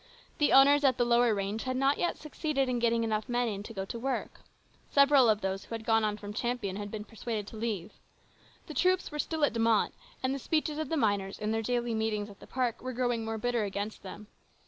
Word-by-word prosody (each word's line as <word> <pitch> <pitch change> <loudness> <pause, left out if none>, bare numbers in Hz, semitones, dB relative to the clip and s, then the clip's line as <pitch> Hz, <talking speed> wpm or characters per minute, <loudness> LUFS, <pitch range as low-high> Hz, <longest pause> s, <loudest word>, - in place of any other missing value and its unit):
The 295 - +3
owners 285 +2 +7
at 260 -3 +4
the 240 - +2
lower 240 0 +4
range 200 +2 -2
had 255 0 -1
not 275 +2 +2
yet 345 - 0
succeeded 300 -3 -2
in 250 -1 0
getting 235 -1 +2
enough 215 0 -1
men 245 0 +1
in 200 -3 -3
to 210 - -9
go 195 -3 -4
to 235 - -6
work. 265 +2 -3 0.5
Several 280 -3 +6
of 215 0 +2
those 190 0 -3
who 230 - -5
had 225 -1 -7
gone 225 -1 +3
on 210 -1 0
from 205 -1 -7
Champion 240 -4 -2
had 205 0 -5
been 210 0 -5
persuaded 220 -1 -5
to - - -11
leave. 215 -4 -3 0.7
The - - -8
troops 370 -1 +2
were 300 - -5
still 315 0 +1
at - - -2
De 230 - -2
Mott, 225 -2 +3 0.3
and 260 +1 +1
the 275 - -3
speeches 310 +2 -1
of 315 - -3
the 325 - 0
miners 200 -6 0
in 215 0 -2
their 225 0 0
daily 240 0 -1
meetings 215 -2 -1
at 200 - -16
the - - -13
park 250 -3 -1
were 255 0 -4
growing 245 -2 0
more 225 0 -3
bitter 240 0 0
against 205 +1 -4
them. 205 +2 -9
230 Hz, 240 wpm, -30 LUFS, 210-260 Hz, 0.7 s, owners